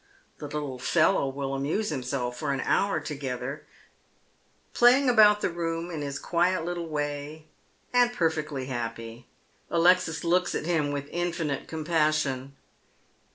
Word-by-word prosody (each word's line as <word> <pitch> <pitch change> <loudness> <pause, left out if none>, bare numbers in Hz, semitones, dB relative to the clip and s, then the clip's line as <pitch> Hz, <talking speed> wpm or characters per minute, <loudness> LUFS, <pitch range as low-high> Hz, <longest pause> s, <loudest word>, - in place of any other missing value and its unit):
The 150 - -6
little 145 -3 -5
fellow 135 +2 +2
will 135 0 -4
amuse 145 +11 -1
himself 125 -3 -3
for 145 +1 -2
an 135 - -1
hour 200 0 +1
together, 140 -1 -5 1.1
play 245 +2 +6
ing 280 -1 0
about 210 -3 +6
the - - +1
room 170 0 -3
in 160 -3 -4
his 140 -1 -4
quiet 175 +2 +1
little 175 -1 -3
way, 145 0 -4 0.5
and 245 -1 +4
perfectly 155 - -1
happy. 115 -2 -6 0.4
Alexis 170 -1 +3
looks 175 +1 +1
at - - -3
him 160 -4 +1
with 140 0 -4
infinite 170 -5 -2
compassion. 155 -4 0
150 Hz, 135 wpm, -27 LUFS, 140-175 Hz, 1.1 s, play